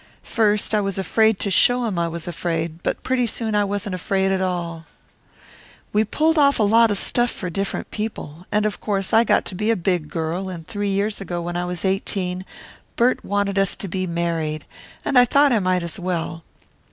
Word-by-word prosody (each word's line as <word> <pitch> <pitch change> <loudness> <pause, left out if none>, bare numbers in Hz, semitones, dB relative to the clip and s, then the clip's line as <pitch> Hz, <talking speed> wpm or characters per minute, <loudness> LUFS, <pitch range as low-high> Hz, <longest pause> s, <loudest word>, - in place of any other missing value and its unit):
First 210 -1 +1
I 210 - +3
was 195 -1 -2
afraid 220 +2 +2
to 200 - 0
show 245 +5 +4
him 195 -6 -1
I 170 - +1
was 165 0 -6
afraid, 165 -1 -3
but - - -2
pretty 255 -2 +1
soon 225 -1 -2
I 210 0 +3
wasn't 200 -1 -3
afraid 190 +1 0
at 190 -1 0
all. 170 -3 -3 1.1
"We 210 +1 +4
pulled 315 +8 +1
off 280 -1 +4
a 220 - +2
lot 225 +2 +5
of 205 - 0
stuff 240 +4 +2
for 180 -6 -5
different 195 +3 -3
people. 185 -6 -6
And 210 0 +2
of 215 - -2
course 195 -3 -2
I 225 - +6
got - - +2
to - - -4
be 210 +4 -1
a 230 - +4
big 175 -4 -1
girl 170 +3 -3
and 170 -3 -7
three 205 -1 -2
years 200 +1 -1
ago 175 -3 -4
when 175 0 -4
I 175 0 -1
was 180 +1 -4
eighteen 190 -1 -1 0.5
Bert 245 +2 +2
wanted 200 -1 0
us 195 -1 +2
to 200 - -5
be 185 +1 -2
married 165 -2 -2 0.4
and 270 - +4
I 245 - +7
thought 280 +3 +4
I 230 - +3
might 185 -2 +1
as 170 +2 -6
well. 170 -2 -3
195 Hz, 210 wpm, -22 LUFS, 175-215 Hz, 1.1 s, I